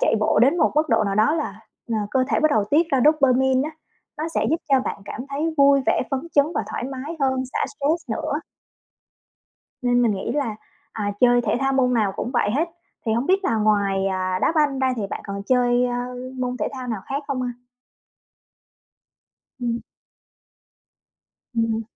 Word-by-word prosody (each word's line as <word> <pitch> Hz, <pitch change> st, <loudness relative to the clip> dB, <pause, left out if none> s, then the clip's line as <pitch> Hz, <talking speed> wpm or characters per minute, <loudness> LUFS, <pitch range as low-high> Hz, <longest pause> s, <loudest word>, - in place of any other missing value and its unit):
chạy -, -, +3 dB
bộ 215 Hz, -, +2 dB
đến 275 Hz, +8 st, +4 dB
một -, -, +3 dB
mức 310 Hz, +1 st, +2 dB
độ 215 Hz, -, +3 dB
nào 195 Hz, -1 st, -1 dB
đó 215 Hz, +9 st, +3 dB
là, 320 Hz, -, -4 dB, 0.3 s
ờ, 230 Hz, -, -1 dB, 0.2 s
cơ 260 Hz, -1 st, +2 dB
thể -, -, +1 dB
bắt 310 Hz, -1 st, +3 dB
đầu 215 Hz, -6 st, +2 dB
tiết 300 Hz, +10 st, +2 dB
ra 270 Hz, -3 st, +3 dB
dopamine 265 Hz, -2 st, +3 dB
á, -, -, -7 dB, 0.5 s
nó 315 Hz, +2 st, -2 dB
sẽ -, -, +1 dB
giúp 320 Hz, -, +3 dB
cho 270 Hz, -2 st, +4 dB
bạn 200 Hz, -, -5 dB
cảm 205 Hz, -, -6 dB
thấy 305 Hz, +4 st, -2 dB
vui 280 Hz, -1 st, +6 dB
vẻ -, -, +2 dB
phấn 270 Hz, -2 st, 0 dB
chấn 285 Hz, 0 st, +5 dB
và -, -, 0 dB
thoải -, -, -3 dB
mái 270 Hz, +5 st, -6 dB
hơn, 260 Hz, -1 st, +1 dB
xả -, -, -2 dB
stress 295 Hz, +4 st, -2 dB
nữa. -, -, -2 dB, 1.5 s
Nên 245 Hz, 0 st, +3 dB
mình 235 Hz, -, +3 dB
nghĩ 195 Hz, +3 st, -3 dB
là, 255 Hz, -7 st, -1 dB, 0.4 s
à, 205 Hz, -2 st, -2 dB
chơi 245 Hz, -1 st, +5 dB
thể 235 Hz, -, 0 dB
thao 270 Hz, 0 st, +1 dB
môn 255 Hz, -2 st, +2 dB
nào 210 Hz, -4 st, +1 dB
cũng -, -, -3 dB
vậy 240 Hz, -5 st, +1 dB
hết, 305 Hz, +9 st, 0 dB, 0.4 s
thì 220 Hz, -, +2 dB
hổng 235 Hz, +4 st, 0 dB
biết 385 Hz, +1 st, +2 dB
là 230 Hz, -, +1 dB
ngoài, 200 Hz, -3 st, +2 dB
à, 185 Hz, -1 st, -1 dB
đá -, -, +3 dB
banh 295 Hz, -4 st, +2 dB
ra 260 Hz, -1 st, +2 dB
thì 220 Hz, -, -2 dB
bạn -, -, -4 dB
còn 200 Hz, 0 st, -5 dB
chơi, 245 Hz, -1 st, +3 dB
ờ, 245 Hz, -, -2 dB, 0.5 s
môn 250 Hz, 0 st, -2 dB
thể -, -, -1 dB
thao 255 Hz, -2 st, -6 dB
nào 220 Hz, -4 st, -2 dB
khác 280 Hz, +2 st, -2 dB
không 255 Hz, -2 st, -2 dB
ha? 245 Hz, -1 st, -2 dB, 2.1 s
Ừm. 235 Hz, -1 st, -1 dB, 1.7 s
Ừm 230 Hz, -, +2 dB
hừm. 225 Hz, -, -2 dB
255 Hz, 200 wpm, -23 LUFS, 225-280 Hz, 2.1 s, vui